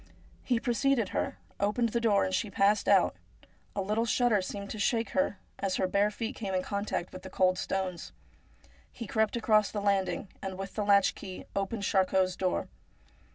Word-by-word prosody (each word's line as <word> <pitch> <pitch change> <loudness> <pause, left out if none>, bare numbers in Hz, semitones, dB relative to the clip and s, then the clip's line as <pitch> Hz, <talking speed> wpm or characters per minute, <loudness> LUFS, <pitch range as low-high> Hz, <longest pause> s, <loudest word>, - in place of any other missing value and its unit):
He 245 -3 +1
preceded 240 -2 +1
her, - - -2 0.2
opened 210 +4 +1
the 235 +1 -1
door 210 -4 +3
and 185 - -3
she 210 - 0
passed 200 +1 +2
out; - - +4 0.6
a 200 - 0
little 215 +4 0
shudder 230 -2 +3
seemed 200 +2 -6
to 215 - -5
shake 225 +1 +1
her 190 +2 +1 0.2
as 195 -2 -1
her - - +1
bare 200 +3 +2
feet 225 +4 -4
came 195 -4 -3
in 185 - 0
contact 200 -3 -3
with 185 - -8
the 190 - -9
cold 185 -1 +2
stones. 190 -2 -3 0.8
He 230 - -7
crept 220 +2 +1
across 215 -3 +3
the 210 - -3
landing, 200 -1 0
and 190 -1 -5
with 195 0 -6
the 210 - -1
latch 200 -1 +5
key 185 -2 -8
opened 200 +2 -2
Charcot's 190 -1 +2
door. 185 -1 -1
200 Hz, 185 wpm, -30 LUFS, 190-220 Hz, 0.8 s, latch